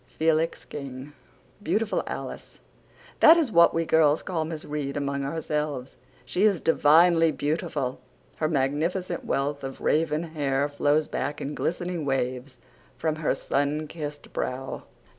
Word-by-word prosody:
FELIX 160 +1 0
KING. 140 0 -8 0.5
BEAUTIFUL 215 +1 0
ALICE - - -7 0.6
That 325 +2 +8
is 305 -8 +1
what 170 -3 +6
we 165 0 0
girls 155 -1 +3
call 165 -4 -2
Miss 160 -1 -6
Reade 145 -1 -3
among 140 -1 -2
ourselves. 150 -3 -3 0.3
She 180 +9 -2
is 205 -4 +4
divinely 165 +1 +5
beautiful. 150 -4 -2 0.4
Her 155 - +1
magnificent 160 +6 -1
wealth 140 +1 -1
of 135 0 -6
raven 155 0 +1
hair 145 -4 -1
flows 145 +1 +1
back 145 - -3
in 145 - -4
glistening 175 +1 -2
waves 130 -1 -2 0.4
from 155 +2 -1
her 155 - 0
sun 145 +2 -1
kissed 150 -2 -7
brow. 130 +1 -4
150 Hz, 135 wpm, -26 LUFS, 140-165 Hz, 0.6 s, That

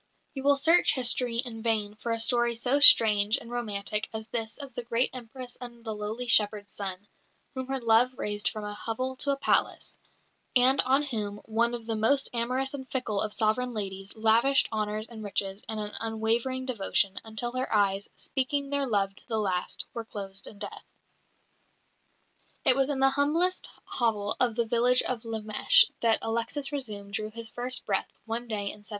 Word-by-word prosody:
You 270 - -5
will 285 +1 +5
search 325 +4 +5
history 245 -2 +1
in 235 -2 -3
vain 220 -3 0
for 230 +2 -5
a 230 - -1
story 240 0 +2
so 250 +5 +1
strange 215 -5 +7
and 235 -2 -11
romantic 210 -3 -2
as 220 0 -6
this 225 -2 -4
of 280 -2 -10
the - - -4
great 235 +1 0
Empress 250 0 -4
and 240 -1 -10
the 220 - -3
lowly 215 +4 -5
shepherd's 210 -3 +2
son, 195 0 -5 0.5
whom 260 -1 -5
her 270 0 -2
love 235 +2 +3
raised 205 0 -1
from 215 -1 -7
a 210 0 -5
hovel 255 +5 -4
to 280 - -3
a 280 - +1
palace, - - 0 0.6
and 260 +2 +5
on 270 +3 +3
whom 215 -7 -4
one 235 +2 0
of 230 -1 -9
the 225 -1 -2
most 245 +6 +2
amorous 255 +3 -1
and 265 -2 -7
fickle 235 -6 -1
of 215 - -1
sovereign 225 +3 0
ladies 195 -1 -5
lavished 225 +5 +3
honours 215 0 -2
and 225 -2 -10
riches 195 0 -1
and 220 -1 -3
an 210 0 -4
unwavering 230 +4 -1
devotion, 200 -5 +1
until 220 +2 -2
her 255 +1 -3
eyes, 200 -2 +1
speaking 280 +1 -2
their 280 -1 0
love 200 -4 0
to - - -14
the 225 -3 -1
last, 185 -4 -1
were 230 - -4
closed 195 -3 -6
in 205 - -11
death. 205 0 -6 1.8
It 255 - +5
was 270 +1 +1
in 275 -2 -1
the 270 0 +5
humblest 310 +7 +1 0.2
hovel 215 -3 0
of 240 -3 +1
the 235 0 +1
village 245 +2 +3
of 240 -2 -3
Lemesh 220 -1 +3
that 230 -1 +3
Alexis 235 +5 0
Razoum 210 -8 -2
drew 215 +1 -3
his 230 0 -2
first 250 +1 -2
breath 195 -2 -1
one 230 +2 -4
day 215 -3 -2
in 210 - -12
1709. - - -13
230 Hz, 185 wpm, -28 LUFS, 215-255 Hz, 1.8 s, strange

